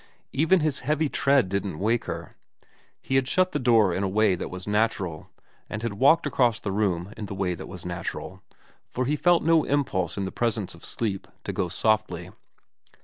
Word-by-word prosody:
Even 160 +6 +3
his 155 -3 0
heavy 150 +3 0
tread 135 -6 +3
didn't 100 -3 -2
wake 110 +5 0
her. - - -6 0.7
He 135 - +1
had 135 -1 +1
shut 185 +5 +2
the - - -1
door 115 -7 +4
in 95 - -1
the 100 - +1
way 105 +1 +3
that 90 - -4
was 90 0 -7
natural, 105 -6 -1 0.4
and 105 +1 -5
had 115 -3 -2
walked 140 +11 +4
across 125 -5 +2
the 100 - -3
room 95 -2 -1
in 105 -2 -5
the 100 - -6
way 95 -2 0
that 85 - -8
was - - -9
natural, - - -5 0.5
for 130 - -2
he 145 +4 +1
felt 175 +2 +3
no 165 -1 +4
impulse 95 - 0
in 100 - -1
the 95 - -4
presence 115 -5 -1
of 85 - -15
sleep 105 -4 -3 0.2
to - - -4
go 90 - -1
softly. 90 -2 0
110 Hz, 200 wpm, -26 LUFS, 95-135 Hz, 0.7 s, door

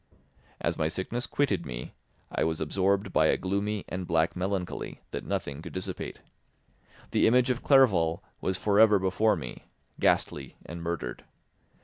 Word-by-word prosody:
As - - -1
my 80 - +2
sickness 95 +9 -3
quitted 105 - +1
me, 60 -4 -6 0.4
I - - 0
was 80 0 0
absorbed 95 +5 +1
by - - +5
a - - +3
gloomy 100 +2 -1
and 90 0 -4
black 80 0 +2
melancholy 95 0 -3
that - - -4
nothing 70 +1 -3
could 85 - -9
dissipate. 95 0 -5 0.9
The - - +4
image 125 +2 +4
of 125 - -2
Clerval 95 - +4 0.2
was 95 -1 0
for 100 +1 +2
ever 110 -2 +7
before 95 +3 +2
me, 65 -8 -7 0.4
ghastly 70 -2 +1
and 85 +1 -7
murdered. 85 -8 -4
95 Hz, 150 wpm, -28 LUFS, 80-105 Hz, 0.9 s, ever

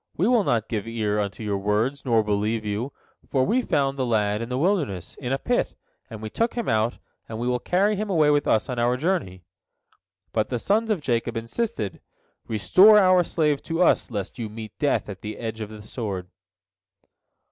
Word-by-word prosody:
We 185 - +2
will 240 -3 +4
not 115 - 0
give 110 -2 -3
ear 110 -2 -1
unto 100 +1 -3
your 100 -2 -1
words, 110 +8 0
nor 115 -3 +3
believe 105 +2 -1
you, 105 +6 -2 0.4
for 130 -2 +2
we 250 - +2
found 140 - 0
the - - +2
lad 105 -2 +1
in 115 - -5
the 125 - -2
wilderness, 145 - 0
in 125 -2 -4
a 135 - +2
pit, 245 - -1 0.3
and 110 -3 -8
we 110 - -4
took 230 +1 0
him 235 - -2
out, 110 +2 +1 0.3
and 110 - -5
we 120 +2 -2
will 125 0 +1
carry 200 +8 +2
him 210 +1 -3
away 155 -5 +4
with 145 -1 +2
us 110 - +2
on 125 -3 -3
our 120 +1 +2
journey." 135 - -1 0.9
But 110 -1 0
the 125 - -1
sons 215 - +1
of 205 -7 0
Jacob 115 -3 -1
insisted, 115 - -3 0.5
"Restore 185 - +6
our 185 -3 +5
slave 150 -4 0
to 165 +2 0
us, - - +3
lest 100 0 -5
you 110 -2 -3
meet 110 0 -8
death 145 - +1
at 100 -2 -8
the 110 0 -6
edge 110 -1 -5
of 105 - -5
the 105 -1 -10
sword." 100 -5 -5
120 Hz, 200 wpm, -24 LUFS, 105-160 Hz, 0.9 s, Restore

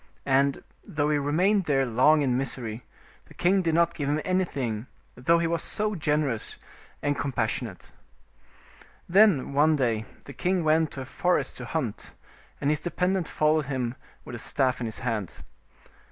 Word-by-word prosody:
And, 135 +1 +2 0.2
though 150 0 -1
he 150 - +2
remained 180 +8 +2
there 135 -3 +2
long 130 +6 +4
in 125 -3 +1
misery, 120 -3 -3 0.4
the - - -17
king 190 +2 +3
did 165 -3 0
not 170 0 +3
give 145 -3 -3
him 150 +1 +1
anything, 135 - -1 0.3
though 150 +8 +2
he 170 - 0
was 165 +4 -1 0.2
generous 150 -6 -1 0.5
and 145 0 +1
compas 125 -6 -1
sionate. - - -6 1.2
Then, 185 -8 +4
one 155 +3 +4
day 115 -6 0 0.2
the 140 - -9
king 180 +6 0
went 160 0 +3
to 135 - -6
a - - -6
forest 180 +6 0
to - - -7
hunt, 130 -10 -4 0.4
and 140 - +1
his 150 - 0
dependent 180 +1 -1
followed 155 0 +2
him 130 -3 -2 0.3
with - - -9
a 120 - -4
staff 130 +1 0
in 120 - -1
his 110 - -5
hand. 105 -7 -3
145 Hz, 165 wpm, -27 LUFS, 130-165 Hz, 1.2 s, long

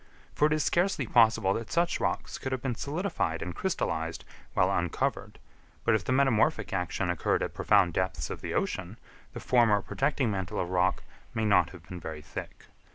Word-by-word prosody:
For 150 - +3
it 155 - +1
is 155 -1 +1
scarcely 175 -6 +1
possible 115 -4 +4
that 115 +1 -5
such 170 +1 +1
rocks - - -2
could 130 - -4
have 130 -2 -2
been 130 -3 0
solidified 145 - -2
and 90 - -5
crystallised 80 - -2 0.3
while - - +3
uncovered; - - -2 0.5
but 115 - +3
if 110 -3 +1
the - - -2
metamorphic 130 -3 +2
action 90 0 -1
occurred 90 - 0
at - - -4
profound 85 - +3
depths 85 -5 -2
of - - -6
the - - -4
ocean, - - -2 0.4
the - - -6
former 115 -5 +4
protecting 135 -4 0
mantle 95 -3 -3
of 90 - -2
rock 90 0 +1 0.3
may 110 -1 0
not 95 -5 +4
have 90 -2 -13
been 90 - -7
very 80 -2 -7
thick. 75 - -8
110 Hz, 185 wpm, -29 LUFS, 90-135 Hz, 0.5 s, possible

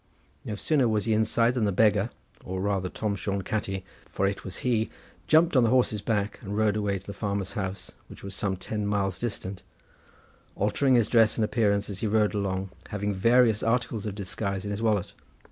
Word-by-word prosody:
No 105 - -4
sooner 135 +3 +2
was 110 -2 0
he 115 - +2
inside 110 +2 +2
than 120 -4 +1
the 100 - +1
beggar, 105 +2 +3 0.3
or 95 0 -4
rather 95 -1 0
Tom 105 +1 -2
Shone 100 0 -2
Catti, 95 -2 -2 0.3
for 95 - -1
it 100 0 -1
was 95 -1 -6
he, 115 -3 +1 0.4
jumped 160 +1 +4
on 130 - +6
the 115 - +3
horse's 120 -4 +2
back, 105 -1 -1
and 100 0 -4
rode 110 -2 +2
away 105 -2 0
to 95 - -12
the 100 - -6
farmer's 100 -1 -2
house, 95 -1 -4 0.2
which - - -13
was 100 0 -6
some 95 0 -1
ten 105 +2 -3
miles 95 -3 0
distant, 100 -5 -4 0.9
altering 125 +6 +2
his 115 -3 +4
dress 115 -2 +4
and 110 - +2
appearance 105 -4 +1
as 100 -2 -6
he 110 - -1
rode 105 0 +2
along, 95 -2 -2 0.2
having 105 0 -2
various 115 +2 +4
articles 115 -2 0
of 100 - -4
disguise 100 0 -3
in 105 - -3
his 100 +2 -3
wallet. 105 -4 +1
105 Hz, 200 wpm, -27 LUFS, 100-110 Hz, 0.9 s, on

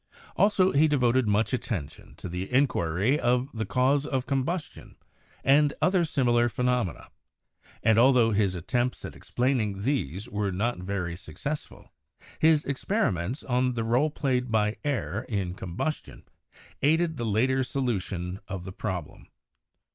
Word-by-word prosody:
Also 195 -2 +3
he 150 +3 +4
devoted 130 -4 +2
much 105 +4 +1
attention 95 - -4
to - - -8
the 90 +4 -5
inquiry 125 - +2
of 125 +2 +1
the 110 -1 -3
cause 135 +3 +2
of 135 -3 -2
combustion 150 +5 -3 0.5
and 145 +2 +4
other 180 -1 +3
similar 120 -6 +2
phenomena, 125 - -1 0.7
and 110 0 +4
altho 120 -2 +5
his 100 -3 +1
attempts 120 +8 -2
at - - -8
explaining 115 -6 -1
these 105 - -1
were 105 -4 -2
not 105 +4 -1
very 90 -2 -3
successful, 140 - -7 0.5
his 155 -1 +4
experiments 135 - -1
on 125 0 0
the 115 - -1
role 125 +7 +2
played 130 -4 -1
by 105 -1 +2
air 145 -3 -2
in 95 -5 -2
combustion 95 - -5 0.6
aided 160 +2 +2
the 120 - -3
later 125 +5 +2
solution 100 -8 -3
of 95 -2 -5
the 95 0 -8
problem. 95 -6 -5
120 Hz, 135 wpm, -27 LUFS, 100-140 Hz, 0.7 s, altho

